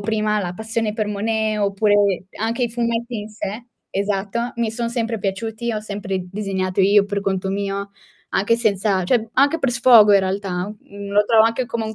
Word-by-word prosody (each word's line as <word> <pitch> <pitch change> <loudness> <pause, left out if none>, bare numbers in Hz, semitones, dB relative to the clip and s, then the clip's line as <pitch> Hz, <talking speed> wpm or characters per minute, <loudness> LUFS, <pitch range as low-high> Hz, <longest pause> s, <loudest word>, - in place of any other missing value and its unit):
prima, 215 0 0
la 180 -4 -3
passione 220 +1 -2
per 215 -1 -2
Monet 215 +1 -1
oppure 200 -2 +2
anche 230 +3 -1
i 235 - 0
fumetti 235 0 -2
in 210 +1 -7
sé, 215 +2 -6 0.2
esatto, 200 +4 -2
mi 230 -2 0
son 235 +1 -3
sempre 230 -2 -2
piaciuti, 220 +4 -3
ho 215 - -2
sempre 200 -3 -4
disegnato 190 -2 -2
io 200 +1 +5
per 200 0 -3
conto 190 -1 -2
mio, 200 0 -3 0.4
anche 205 +4 +2
senza 200 -4 +1
cioè 225 +2 +1
anche 285 +5 +3
per 270 -5 0
sfogo 235 -4 +7
in 200 - +6
realtà, 190 -1 -2
mhmm, 200 0 -10
lo 205 +1 +3
trovo 220 +1 +5
anche 230 +3 0
come 230 -1 -3
un 220 - -5
210 Hz, 185 wpm, -21 LUFS, 200-230 Hz, 0.4 s, sfogo